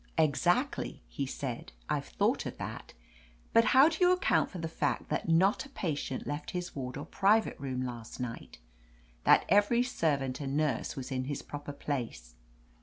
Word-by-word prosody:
"Exactly," 175 Hz, -, +1 dB
he 140 Hz, -, -3 dB
said. 130 Hz, -, -5 dB
"I've -, -, -1 dB
thought -, -, 0 dB
of -, -, -7 dB
that, -, -, -7 dB, 0.6 s
but 230 Hz, 0 st, +6 dB
how 265 Hz, +6 st, +7 dB
do 320 Hz, -1 st, -2 dB
you 360 Hz, 0 st, +6 dB
account 365 Hz, +1 st, +2 dB
for 185 Hz, -, -8 dB
the 165 Hz, -1 st, -3 dB
fact 160 Hz, -, -1 dB
that -, -, -1 dB
not 185 Hz, +5 st, +4 dB
a 270 Hz, -, -12 dB
patient 150 Hz, -, -3 dB
left 145 Hz, +1 st, -4 dB
his 180 Hz, 0 st, -5 dB
ward 125 Hz, -2 st, -4 dB
or 145 Hz, -, -5 dB
private 210 Hz, +3 st, +3 dB
room 130 Hz, -2 st, -3 dB
last 120 Hz, -1 st, -7 dB
night? 120 Hz, -, -6 dB, 0.7 s
That -, -, +6 dB
every 205 Hz, +5 st, +4 dB
servant 140 Hz, -, 0 dB
and 140 Hz, 0 st, -2 dB
nurse 150 Hz, -5 st, 0 dB
was 135 Hz, -1 st, -6 dB
in 130 Hz, -1 st, -1 dB
his 145 Hz, 0 st, -4 dB
proper 145 Hz, 0 st, -6 dB
place? 120 Hz, -, -4 dB
145 Hz, 175 wpm, -31 LUFS, 130-195 Hz, 0.7 s, how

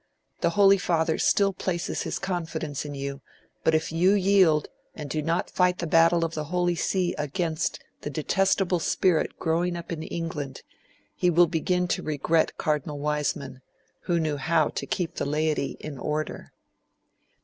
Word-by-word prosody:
The -, -, +2 dB
Holy 195 Hz, -1 st, +6 dB
Father 160 Hz, -2 st, +1 dB
still 200 Hz, -1 st, +3 dB
places 175 Hz, -2 st, -2 dB
his -, -, -3 dB
confidence 160 Hz, -6 st, -3 dB
in 145 Hz, -1 st, -6 dB
you; 140 Hz, 0 st, -5 dB, 0.4 s
but 160 Hz, -, +3 dB
if 160 Hz, 0 st, 0 dB
you 175 Hz, +4 st, +4 dB
yield 185 Hz, -6 st, +4 dB, 0.3 s
and 150 Hz, -, -6 dB
do 155 Hz, +2 st, -2 dB
not 165 Hz, +3 st, -1 dB
fight 180 Hz, 0 st, +2 dB
the 175 Hz, -, -3 dB
battle 165 Hz, +1 st, +4 dB
of 165 Hz, -, -4 dB
the 155 Hz, -1 st, -3 dB
Holy 175 Hz, +2 st, +1 dB
See 180 Hz, +1 st, 0 dB
against 160 Hz, +2 st, -1 dB, 0.2 s
the -, -, -4 dB
detestable 185 Hz, +4 st, +1 dB
spirit 170 Hz, 0 st, +1 dB
growing 170 Hz, +2 st, 0 dB
up 170 Hz, -, -8 dB
in 165 Hz, -2 st, -3 dB
England, 160 Hz, -4 st, -5 dB, 0.5 s
he 180 Hz, -, +2 dB
will 175 Hz, +1 st, +6 dB
begin 180 Hz, +2 st, 0 dB
to -, -, 0 dB
regret 155 Hz, +2 st, 0 dB
Cardinal 150 Hz, -1 st, -1 dB
Wiseman, 145 Hz, -3 st, -2 dB, 0.4 s
who 170 Hz, -1 st, +1 dB
knew 155 Hz, -2 st, -1 dB
how 160 Hz, +2 st, +2 dB
to -, -, -5 dB
keep 175 Hz, -3 st, -2 dB
the -, -, -1 dB
laity 150 Hz, -1 st, -1 dB
in 145 Hz, -4 st, -7 dB
order.' 150 Hz, +2 st, -3 dB
165 Hz, 160 wpm, -26 LUFS, 150-180 Hz, 0.5 s, Holy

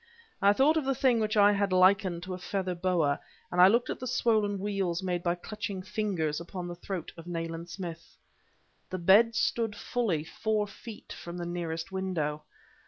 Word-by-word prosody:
I 200 Hz, -, +6 dB
thought 280 Hz, +9 st, +4 dB
of 305 Hz, -, 0 dB
the 270 Hz, 0 st, +1 dB
thing 250 Hz, -2 st, +3 dB
which 215 Hz, 0 st, 0 dB
I 205 Hz, 0 st, +7 dB
had 200 Hz, -1 st, +1 dB
likened 185 Hz, -1 st, +4 dB
to 185 Hz, +1 st, -5 dB
a 180 Hz, -, -6 dB
feather 185 Hz, +1 st, -2 dB
boa; 170 Hz, -5 st, +1 dB, 0.3 s
and 180 Hz, -, +3 dB
I 180 Hz, -, +10 dB
looked 235 Hz, +5 st, +2 dB
at -, -, -5 dB
the 255 Hz, -, -5 dB
swollen 220 Hz, -5 st, +1 dB
weals 195 Hz, -3 st, -1 dB
made 180 Hz, -2 st, -1 dB
by 175 Hz, -1 st, 0 dB
clutching 205 Hz, 0 st, -5 dB
fingers 185 Hz, -6 st, -1 dB
upon 175 Hz, +1 st, -6 dB
the 175 Hz, -, -5 dB
throat 175 Hz, 0 st, -6 dB
of 165 Hz, +1 st, -10 dB
Nayland 165 Hz, 0 st, -4 dB
Smith. 170 Hz, -3 st, -8 dB, 0.7 s
The 185 Hz, -, -3 dB
bed 205 Hz, +6 st, +5 dB
stood 230 Hz, -2 st, 0 dB
fully 205 Hz, -10 st, -1 dB
four 215 Hz, +5 st, -1 dB
feet 210 Hz, +2 st, -10 dB
from 170 Hz, +1 st, -8 dB
the 175 Hz, -, -4 dB
nearest 170 Hz, -1 st, -4 dB
window. 170 Hz, -6 st, -2 dB
190 Hz, 185 wpm, -29 LUFS, 175-210 Hz, 0.7 s, I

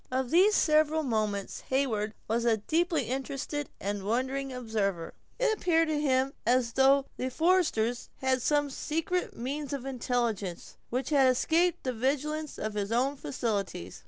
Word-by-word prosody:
Of 255 Hz, -1 st, -1 dB
these 390 Hz, +5 st, +5 dB
several 310 Hz, 0 st, +3 dB
moments 215 Hz, -6 st, -2 dB
Heyward 225 Hz, -6 st, 0 dB
was 230 Hz, +2 st, 0 dB
a 230 Hz, -2 st, +3 dB
deeply 330 Hz, -, 0 dB
interested 275 Hz, +2 st, -3 dB
and 200 Hz, +1 st, -3 dB
wondering 260 Hz, +6 st, -1 dB
observer. 215 Hz, -8 st, -2 dB, 0.3 s
It -, -, +2 dB
appeared 330 Hz, -4 st, +2 dB
to 300 Hz, -1 st, 0 dB
him 265 Hz, -1 st, +1 dB
as 240 Hz, -1 st, +2 dB
though 270 Hz, +1 st, +4 dB
the 255 Hz, -, -2 dB
foresters 285 Hz, -7 st, +1 dB
had 260 Hz, -1 st, 0 dB
some 290 Hz, +1 st, +1 dB
secret 330 Hz, +6 st, -2 dB
means 280 Hz, +4 st, -4 dB
of 270 Hz, -2 st, -4 dB
intelligence, 235 Hz, -8 st, -2 dB
which 255 Hz, +5 st, -2 dB
had 270 Hz, -3 st, +5 dB
escaped 325 Hz, +7 st, +2 dB
the 255 Hz, -, -1 dB
vigilance 295 Hz, +5 st, -2 dB
of 215 Hz, 0 st, -3 dB
his 205 Hz, 0 st, -3 dB
own 260 Hz, +5 st, +1 dB
faculties. 200 Hz, -, -3 dB
260 Hz, 150 wpm, -29 LUFS, 230-300 Hz, 0.3 s, these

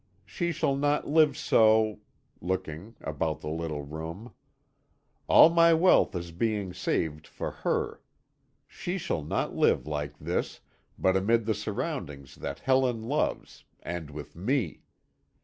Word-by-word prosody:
She 170 Hz, -1 st, -2 dB
shall 140 Hz, -3 st, 0 dB
not 145 Hz, +1 st, +1 dB
live 150 Hz, -2 st, +4 dB
so 110 Hz, -3 st, +4 dB, 0.2 s
" -, -, -39 dB
looking, 95 Hz, +3 st, -4 dB
about 80 Hz, 0 st, -2 dB
the -, -, -5 dB
little 80 Hz, -2 st, -3 dB
room. 80 Hz, +10 st, -7 dB, 0.9 s
"All 165 Hz, -, +8 dB
my 170 Hz, 0 st, +6 dB
wealth 175 Hz, -, +4 dB
is 85 Hz, -1 st, -4 dB
being 100 Hz, 0 st, -1 dB
saved 80 Hz, -4 st, -2 dB
for -, -, -5 dB
her. -, -, -2 dB, 0.7 s
She 180 Hz, +2 st, -4 dB
shall 170 Hz, -, -2 dB
not 75 Hz, -, -2 dB
live -, -, +3 dB
like 75 Hz, -1 st, -4 dB
this, 85 Hz, +4 st, -3 dB, 0.4 s
but 95 Hz, 0 st, +2 dB
amid 110 Hz, +4 st, +2 dB
the 110 Hz, -, +1 dB
surroundings 100 Hz, -, -5 dB
that 70 Hz, -, -6 dB
Helen 130 Hz, -4 st, +2 dB
loves, 145 Hz, +7 st, -2 dB, 0.2 s
and 85 Hz, -2 st, -5 dB
with 75 Hz, -1 st, -9 dB
me. 105 Hz, -, -1 dB
95 Hz, 135 wpm, -28 LUFS, 80-135 Hz, 0.9 s, All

